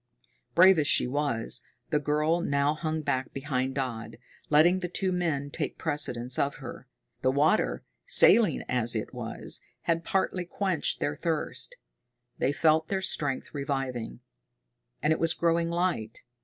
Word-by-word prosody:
Brave 185 0 +7
as 145 - +1
she - - +4
was, 125 -3 -1 0.3
the 150 - +2
girl 150 +3 +1
now 140 -1 +1
hung 155 0 -3
back 130 -2 -1
behind 130 -1 -2
Dodd, 115 -4 -4 0.3
letting 170 +5 +5
the 180 - -3
two 185 +1 -1
men 155 -6 -1
take - - -4
precedence 125 -4 0
of 140 +1 0
her. 130 -1 -9 0.3
The 130 - +2
water, 150 +10 +1 0.2
saline 230 - +5
as 120 -2 0
it 110 - -4
was, - - -5 0.2
had 165 0 0
partly 185 0 -1
quenched 185 -2 -1
their 145 - -1
thirst. 165 - -3 0.6
They 135 - +2
felt 155 +1 +2
their 190 -1 -2
strength 145 -7 -2
reviving. 135 - -4 0.8
And 155 +1 +3
it - - -3
was 165 0 +3
growing 170 0 +1
light. 170 -11 -2
150 Hz, 145 wpm, -28 LUFS, 130-170 Hz, 0.8 s, Brave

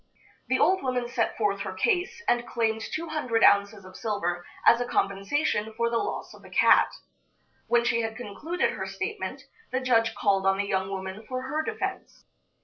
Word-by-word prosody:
The 260 - +2
old 375 +4 +3
woman 250 -2 -1
set 240 -1 -1
forth 205 -3 +1
her 195 -1 -4
case, 375 - 0
and 240 0 +2
claimed 220 -1 0
two 325 +8 -4
hundred 250 -8 0
ounces 200 -1 +4
of 185 0 -13
silver 175 -6 -2 0.2
as 235 - +6
a 245 - -2
compensation 210 +3 0
for 235 0 +1
the 230 - +2
loss - - -4
of - - -15
the - - -14
cat. - - +5 0.8
When 235 0 +3
she 230 -1 +2
had 225 -1 -4
concluded 290 - -2
her - - -5
statement, 415 +3 -4 0.3
the 255 - +1
judge 230 -3 +2
called 195 -2 +2
on 195 0 +3
the 200 - 0
young 190 -1 -1
woman 190 +2 -5
for 255 0 -4
her 300 +4 -1
defense. - - -5
230 Hz, 185 wpm, -27 LUFS, 200-255 Hz, 0.8 s, as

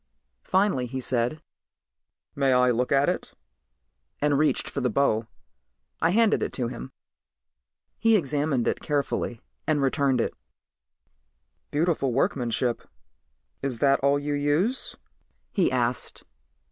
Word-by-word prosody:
Finally 190 -10 +2
he 130 +2 -4
said, 125 +5 -1 0.9
"May 135 -2 +2
I 125 0 +4
look 125 +1 0
at 140 0 +4
it?" - - -2 0.8
and 145 0 +2
reached 150 +2 +1
for 140 - -3
the 125 - +1
bow. 115 -2 +1 0.7
I 165 - +3
handed 220 +3 +3
it - - -2
to 120 -3 -2
him. 130 +1 -8 1.1
He 225 +1 +4
examined 145 - 0
it - - 0
carefully 140 -5 -2 0.3
and 155 -2 +2
returned 135 -1 +2
it. - - 0 1.4
"Beautiful 150 -4 0
workmanship. 120 -2 0 0.8
Is 135 -3 -1
that 140 +2 +3
all 140 +1 +3
you 145 +1 -2
use?" 145 - +1 0.6
he 185 - +2
asked. 125 -1 -1
140 Hz, 120 wpm, -26 LUFS, 125-150 Hz, 1.4 s, I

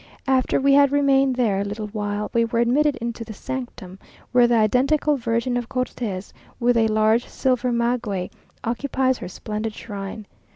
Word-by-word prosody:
After 265 -1 +2
we 275 +1 +4
had 280 -1 +5
remained 275 -2 +3
there 220 -6 +1
a - - 0
little 205 +2 -4
while, 205 0 -3
we 235 - +3
were 230 0 -2
admitted 270 +5 +3
into 235 0 -5
the 220 -2 -9
Sanctum, 205 -8 -7 0.3
where 245 -1 +5
the 240 - +2
identical 265 +7 +2
Virgin 235 0 -1
of 240 -1 -4
Cortes, 235 -7 -4 0.3
with 245 0 +3
a 225 -1 +3
large 220 +2 +2
silver 250 -2 0
maguey, 235 -6 -1 0.3
occupies 260 +2 0
her - - -6
splendid 215 +3 -5
shrine. 205 0 -7
235 Hz, 165 wpm, -23 LUFS, 215-260 Hz, 0.3 s, had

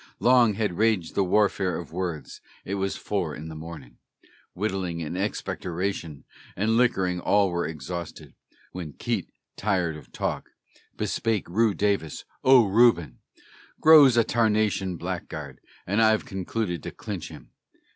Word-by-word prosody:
Long 120 -4 +4
had 100 -5 -2
raged 110 -7 +1
the 100 - +2
warfare 95 -1 +1
of 85 - -8
words; 85 -4 -5 0.2
it 95 - -4
was 95 -1 -1
four 85 -8 -2
in 80 +1 -8
the 80 - -8
morning; 80 -6 -10 0.6
Whittling 95 -4 -2
and 80 +3 -5
expectoration 90 -4 -3 0.3
and 110 +4 +1
liquorin' 95 -7 +2
all 100 +1 +2
were 85 0 -1
exhausted, 80 +2 -7 0.4
When 85 -5 -7
Keitt, - - -2 0.3
tired 90 -6 0
of 75 - -13
talk, - - -3 0.5
bespake 110 -5 -1
Reu. 105 +1 +1
Davis, 100 -6 -1 0.2
"O 130 -3 +7
Reuben, 95 - +3 0.6
Grow's 150 -6 +7
a 115 - +6
tarnation 105 -5 +1
blackguard, 80 -6 -6 0.2
and 100 +4 +1
I've 110 -1 +3
concluded 95 -2 -3
to - - -6
clinch - - -6
him." - - -13
95 Hz, 135 wpm, -26 LUFS, 85-110 Hz, 0.6 s, O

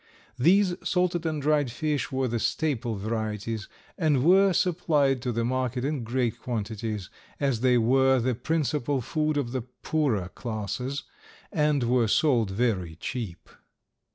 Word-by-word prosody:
These 185 +7 +4
salted 180 -3 0
and 155 -1 -1
dried 145 -3 +1
fish 150 +3 -2
were 130 0 0
the 120 -1 -1
staple 120 -5 -1
varieties 110 0 -3 0.3
and 150 -6 +2
were 190 +4 +6
supplied 155 -7 +2
to 125 -1 -1
the 115 0 -1
market 130 0 -1
in 145 -3 -2
great 120 0 -1
quantities, 110 -4 -4 0.3
as 135 -5 +1
they 125 -1 +4
were 130 +3 +4
the 125 +2 +1
principal 145 0 -1
food 155 +4 -1
of 130 -5 -1
the 130 0 -2
poorer 125 - -1
classes 120 +6 -4 0.5
and 150 -6 +2
were 120 -1 +2
sold 120 -3 +3
very 95 -6 -1
cheap. 95 +1 -5
130 Hz, 140 wpm, -27 LUFS, 115-150 Hz, 0.5 s, were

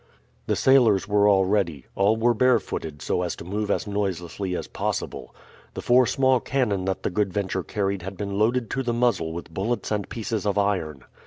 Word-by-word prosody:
The - - +1
sailors 120 -7 +4
were 105 0 +3
all 95 -2 +4
ready. 90 -9 0
All 100 +3 +2
were 120 +2 +3
barefooted 110 - 0
so - - 0
as 90 -1 -2
to - - -10
move 105 +3 -3
as - - 0
noiselessly 95 -2 -3
as - - -4
possible. - - -4 0.4
The - - -5
four 125 0 +5
small 130 -2 +3
cannon 115 -8 -1
that 95 -1 -2
the - - -1
Good 100 +1 0
Venture 95 -1 -2
carried 100 0 -2
had 95 +2 -7
been 100 0 -3
loaded 115 +2 +1
to 135 - -1
the 120 -2 -1
muzzle 115 -9 +1
with 85 0 -8
bullets 110 +8 -2
and 105 -2 -2
pieces 110 -2 -3
of 100 0 0
iron. 90 -9 -1
100 Hz, 195 wpm, -24 LUFS, 95-115 Hz, 0.4 s, four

